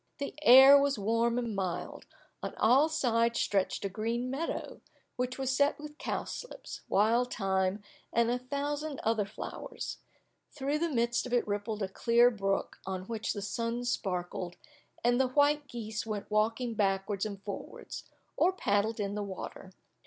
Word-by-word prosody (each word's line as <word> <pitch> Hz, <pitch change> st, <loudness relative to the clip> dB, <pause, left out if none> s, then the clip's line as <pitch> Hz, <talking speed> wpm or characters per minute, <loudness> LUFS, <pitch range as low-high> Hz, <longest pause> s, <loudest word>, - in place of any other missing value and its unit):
The 280 Hz, -, -4 dB
air 270 Hz, +1 st, +9 dB
was 280 Hz, -2 st, +1 dB
warm 230 Hz, +3 st, +1 dB
and 235 Hz, -4 st, -2 dB
mild; 185 Hz, -3 st, -4 dB, 0.3 s
on -, -, -5 dB
all 265 Hz, +8 st, +4 dB
sides 235 Hz, -6 st, +1 dB
stretched 195 Hz, 0 st, 0 dB
a -, -, 0 dB
green 230 Hz, +5 st, -2 dB
meadow, 300 Hz, +5 st, -4 dB, 0.3 s
which 250 Hz, 0 st, -2 dB
was 265 Hz, -1 st, 0 dB
set 285 Hz, +2 st, +2 dB
with 300 Hz, 0 st, -10 dB
cowslips, -, -, -5 dB
wild 230 Hz, +5 st, +3 dB
thyme, 190 Hz, 0 st, 0 dB, 0.3 s
and 235 Hz, 0 st, +2 dB
a 245 Hz, -, 0 dB
thousand 285 Hz, +3 st, -3 dB
other 220 Hz, -2 st, +1 dB
flowers; 475 Hz, -, -6 dB, 0.5 s
through 285 Hz, +1 st, -2 dB
the 335 Hz, +1 st, 0 dB
midst 240 Hz, -2 st, +1 dB
of 250 Hz, -, -6 dB
it 245 Hz, -, +2 dB
rippled 205 Hz, +1 st, -2 dB
a -, -, 0 dB
clear 235 Hz, +5 st, +4 dB
brook 195 Hz, -3 st, -2 dB
on 190 Hz, -1 st, -4 dB
which 220 Hz, +2 st, -3 dB
the 205 Hz, -, -5 dB
sun 230 Hz, +3 st, -2 dB
sparkled, 180 Hz, -6 st, -2 dB, 0.5 s
and 245 Hz, +2 st, +4 dB
the 265 Hz, -, +2 dB
white 290 Hz, +2 st, +2 dB
geese 220 Hz, -4 st, -4 dB
went 215 Hz, -2 st, -5 dB
walking 225 Hz, +3 st, +1 dB
backwards 195 Hz, -1 st, 0 dB
and 200 Hz, -2 st, -5 dB
forwards, 200 Hz, -, -7 dB, 0.3 s
or 365 Hz, -, +4 dB
paddled 220 Hz, -, 0 dB
in 200 Hz, -1 st, -1 dB
the 210 Hz, -, -2 dB
water. 190 Hz, -1 st, -7 dB
230 Hz, 160 wpm, -31 LUFS, 205-265 Hz, 0.5 s, air